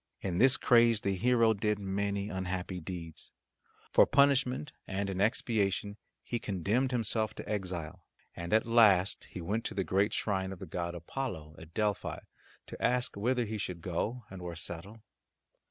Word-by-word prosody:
In 90 -2 -2
this 130 +1 +6
craze 115 -3 +5
the 100 - 0
hero 115 +2 +4
did 105 0 0
many 100 0 -2
unhappy 95 -1 -3
deeds. 85 -2 -8 0.6
For - - +6
punishment 140 0 +3 0.2
and 100 0 -2
in 95 0 -2
expiation 105 -3 +1 0.3
he 120 - -3
condemned 105 +6 0
himself 110 -2 0
to - - -8
exile, 90 -7 -4 0.3
and 85 0 -6
at 110 +1 +4
last 105 -5 +4
he 90 - -8
went 105 +7 -1
to 110 - -3
the 95 - 0
great 100 +3 +2
shrine 95 -2 -1
of 95 - -6
the 95 - -8
god 85 +1 -4
Apollo 85 - -5
at 80 +1 -13
Delphi 105 -2 0 0.5
to - - -10
ask 125 0 +1
whither 120 +4 +1
he 110 0 -4
should 90 -3 -4
go 105 +7 -2
and 95 -2 -8
where 85 -1 -5
settle. 90 +7 -8
100 Hz, 165 wpm, -31 LUFS, 90-115 Hz, 0.6 s, this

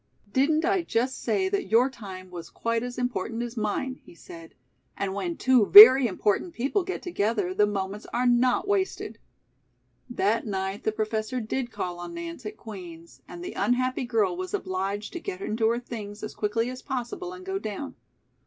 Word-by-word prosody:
"Didn't 305 +4 +2
I 380 0 +2
just 260 -4 -1
say 315 - +1
that 400 +1 -1
your 235 +4 +5
time 190 -8 -9
was 170 -2 -8
quite 230 0 -2
as 245 0 -6
important 235 -2 -2
as 240 0 -6
mine?" 235 +4 -2
he - - -16
said. 165 -1 -12 0.4
"And 195 -1 -2
when 335 - -3
two 255 -5 +4
very 250 +5 +11
important 210 - -1
people 275 - 0
get 375 +1 -5
together 210 - -1
the 210 +2 +3
moments 200 0 -4
are 245 +1 0
not 245 +7 +3
wasted." 395 -2 -1 0.9
That 225 -1 0
night 195 0 -3
the 220 - +2
Professor 215 +3 -2
did 240 +2 -3
call 175 -4 -4
on 175 - -7
Nance 335 -8 -6
at 215 +1 -8
Queen's, 175 -7 -11
and 345 - -9
the 365 - -6
unhappy 255 +1 0
girl 215 -7 +1
was 185 +1 -3
obliged 195 +3 -3
to 345 - -4
get 370 +1 -6
into 225 - 0
her 235 - +1
things 215 -4 -7
as 215 - -5
quickly 225 +3 -1
as 255 - -8
possible 265 +7 -4
and 370 0 -10
go 385 0 -2
down. 215 - -5
230 Hz, 180 wpm, -26 LUFS, 205-265 Hz, 0.9 s, very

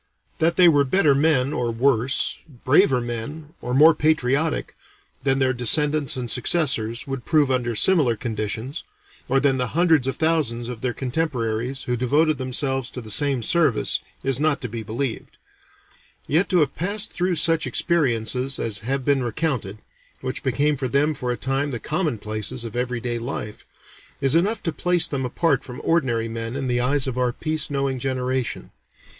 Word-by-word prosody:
That 165 +1 +2
they 180 +1 +6
were 145 -4 +5
better 150 +1 +3
men, 140 -1 +2
or 120 -1 -1
worse, 125 +2 +1 0.3
braver 135 -1 +4
men, 120 +6 -6
or 125 - -5
more 155 +4 +7
patriotic, 150 0 0 0.5
than 135 0 +2
their 130 -1 +2
descendants 145 +4 +2
and 125 -1 -4
successors 120 -3 +2
would 135 -2 -5
prove 150 -4 +2
under 120 -2 0
similar 140 - +3
conditions, 115 +5 -4 0.5
or 135 +2 +3
than 135 -1 +2
the 125 +4 -2
hundreds 160 -7 +3
of 135 - -1
thousands 145 -8 0
of 120 -3 -7
their 125 -2 -2
contemporaries 125 -3 -2
who 125 - -1
devoted 145 +5 +1
themselves 130 0 -1
to - - -8
the 110 -2 -8
same 135 +1 +2
service, 155 -4 +2 0.2
is 135 -1 +1
not 155 -1 +1
to 125 - -3
be 115 0 -6
believed; 115 +3 -5 0.9
yet 165 +6 +1
to 180 -3 +3
have 150 - 0
passed 200 +5 -2
through 180 0 -1
such 165 0 +2
experiences 130 -5 0
as 105 -3 -2
have 130 +4 -3
been 140 -2 +2
recounted, 120 -4 -2 0.4
which 130 0 -3
became 140 +3 0
for 130 - -2
them 140 +4 +1
for 125 -3 -3
a 120 - -3
time 135 +2 -1
the 120 -4 -4
commonplaces 120 - -3
of 115 - -7
every 125 0 -2
day 120 0 -3
life, 115 -3 -6 0.5
is 135 -1 +3
enough 200 +7 +1
to 165 - -1
place 180 +1 +2
them 135 -2 -3
apart 140 +2 0
from 125 -1 -9
ordinary 125 -9 +1
men 115 +1 -5
in 135 -1 -3
the 120 -1 0
eyes 135 +2 +2
of 130 -2 -3
our 125 -1 +1
peace 155 +3 -2
knowing 135 -2 -2
generation. 130 -1 -3
135 Hz, 175 wpm, -22 LUFS, 120-150 Hz, 0.9 s, more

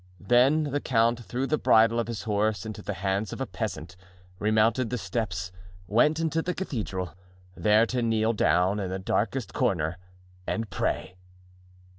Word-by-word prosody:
Then 125 - +4
the 145 -1 -1
count 115 -1 +2
threw 125 +3 -2
the 155 +2 0
bridle 115 +1 +4
of 115 - -1
his 115 -3 -5
horse 105 -2 0
into 110 -1 -6
the 105 - -4
hands 95 +1 0
of - - -6
a 135 - -1
peasant, 95 -8 -5 0.4
remounted 110 +3 +2
the 125 - -2
steps, 100 -3 -3 0.3
went 150 - +3
into 165 0 0
the 180 +2 -3
cathedral, 100 - -4 0.4
there 105 +3 +4
to 125 +1 -2
kneel 115 -1 +1
down 95 -1 +2
in 95 -2 -3
the 95 - -3
darkest 105 +4 -1
corner 85 -1 0 0.5
and 110 -2 -2
pray. 90 - -2
110 Hz, 160 wpm, -27 LUFS, 100-120 Hz, 0.5 s, Then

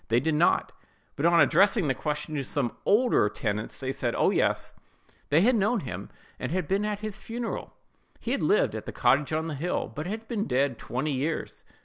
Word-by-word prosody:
They 115 +1 +3
did 160 +5 0
not; 155 +3 +2 0.4
but 150 +4 +2
on 170 0 +5
addressing 190 +2 +4
the 135 - +2
question 150 +3 -3
to 145 -2 -1
some 130 -2 -2
older 215 - +4
tenants, 105 +1 -3
they 130 -1 -3
said, 120 -3 -2
"Oh, - - +3
yes;" - - 0 0.6
they 150 +3 +4
had 245 +6 +4
known 215 +1 +2
him, 100 - -6 0.3
and - - -3
had 180 -3 -1
been 200 +2 +1
at 210 -1 -3
his 215 -1 -5
funeral; 235 0 -5 0.4
he 235 - -4
had 275 - 0
lived 420 +10 +3
at - - -6
the - - -3
cottage 145 +2 +2
on 160 +1 0
the 165 - -3
hill, 165 +6 -2
but 150 +3 -4
had 220 +3 -5
been 220 -4 -2
dead 130 -1 +1
twenty 135 +5 -2
years. 145 +5 -3
160 Hz, 210 wpm, -27 LUFS, 135-210 Hz, 0.6 s, on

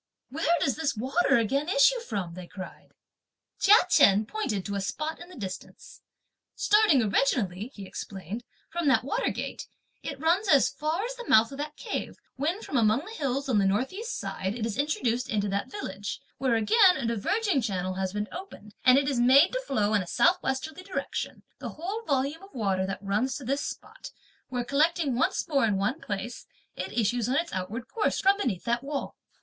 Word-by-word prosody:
"Where 325 +4 +2
does 270 - 0
this 315 -7 -1
water 265 +9 +2
again 275 +8 0
issue 370 - +5
from?" 200 - -4
they 180 0 -9
cried. 185 0 -10 0.7
Chia 405 +2 +7
Chen 200 +2 +5
pointed 215 - -3
to 200 - -4
a 200 - -1
spot 305 +11 -3
at 350 - -10
a 365 - -12
distance. 190 -5 -8 0.5
"Starting 415 - +4
originally," 210 -3 +1
he 200 - -8
explained, 195 +4 -7 0.3
"from 340 -3 -1
that 255 -5 +4
water 450 - 0
gate, - - -5 0.3
it 280 -2 -6
runs 345 +7 +2
as 280 -6 +5
far 305 +7 -2
as - - -4
the 485 -2 -9
mouth 220 +3 +5
of 275 - -8
that 300 +1 -4
cave, - - -4 0.2
when 325 +10 -2
from 275 - -2
among 225 +6 +3
the 430 - -9
hills 275 - -2
on 235 -6 +3
the 195 - +3
north 215 - 0
east 450 +5 -4
side, 190 +3 -3
it 230 -2 -2
is 225 -3 -3
introduced 255 -4 0
into 205 -4 0
that 200 +1 -2
village, 205 - -5 0.2
where 260 -3 +2
again 365 - +5
a 265 - -3
diverging 290 - +1
channel 185 -4 -2
has 190 0 -2
been 210 +1 -3
opened 340 - -9
and 255 0 +7
it 275 -1 +2
is 270 -4 0
made 265 +7 +6
to - - -1
flow 215 - 0
in 210 - +3
a 180 - -7
south 355 - +3
westerly 300 +6 -3
direction; 370 0 -4 0.2
the - - -5
whole 380 +8 -5
volume 280 +3 0
of 390 -4 -15
water 190 -5 0
then 195 - -3
runs 210 +6 0
to 285 - -9
this 275 +3 -1
spot, - - -7 0.4
where 245 -1 -2
collecting 300 +1 +2
once 250 - 0
more 280 -4 +2
in 205 -3 +1
one 230 +11 -1
place, 210 +4 -5 0.3
it 185 +1 -5
issues, 235 +1 0
on 260 - +1
its 335 +3 -1
outward 215 +7 -4
course, 430 +9 0
from 390 +1 +4
beneath 215 - -1
that 235 0 0
wall." 280 0 -4
260 Hz, 200 wpm, -27 LUFS, 210-320 Hz, 0.7 s, Chia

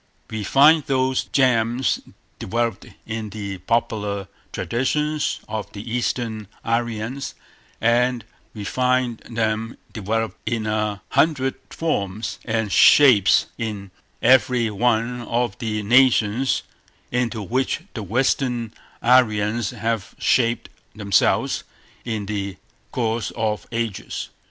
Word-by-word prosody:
We 110 -1 -3
find 150 +8 +6
those 130 -1 +1
germs 125 -1 +2 0.4
developed 115 -1 -2 0.2
in 110 -1 -4
the 100 -2 -6
popular 105 -1 -1 0.2
traditions 150 +5 -1
of 110 -2 -5
the 105 +2 -7
Eastern 115 -3 -2 0.2
Aryans, 115 +3 -2 0.4
and 120 +1 +2 0.3
we 105 - -6
find 125 +1 +1
them 115 0 -1 0.2
developed 110 +1 -2
in 115 -2 -1
a 105 -1 -1
hundred 135 -5 +2 0.2
forms 105 - -2
and 110 -2 -1
shapes 120 -8 +6
in 105 -4 -4 0.3
every 125 -2 +4
one 120 +2 +1
of 120 -2 -1
the 105 -2 -2
nations 120 +1 +3 0.5
into 120 -3 -1
which 130 - -1
the 115 - -5
Western 120 +1 0 0.3
Aryans 115 -3 +3
have 115 -4 -3
shaped 120 -2 +1 0.3
themselves 100 -3 +2 0.4
in 110 -4 -3
the 100 -2 -4 0.3
course 115 -4 -1
of 110 -2 -2
ages. 115 -4 -3
115 Hz, 105 wpm, -22 LUFS, 105-125 Hz, 0.5 s, find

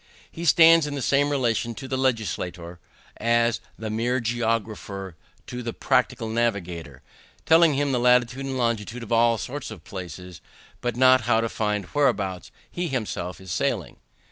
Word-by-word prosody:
He 170 - -6
stands 165 -1 +6
in 145 - -4
the 140 - -3
same 140 +3 +2
relation 120 -4 0
to 135 - -8
the 130 - -2
legislator, 90 -9 -2 0.4
as 115 0 +2 0.2
the 110 -1 -5
mere 120 +4 0
geographer 110 -5 -3 0.3
to 125 - -6
the 115 -1 -4
practical 125 -3 0
navigator; 90 - -2 0.4
telling 165 -2 +5
him 145 0 0
the 125 - +1
latitude 125 +2 +3
and 135 -1 -3
longitude 115 -1 -2
of 115 - -10
all 115 0 +4
sorts 135 +5 -5
of 105 -8 -10
places, 90 -2 -8 0.4
but 120 -2 -2
not 130 -1 +5
how 110 -1 +4
to 115 - 0
find 105 -3 -1
whereabouts 100 -8 0 0.2
he 175 0 -3
himself 105 - -4
is 95 -2 -9
sailing. - - -2
115 Hz, 160 wpm, -24 LUFS, 105-130 Hz, 0.4 s, stands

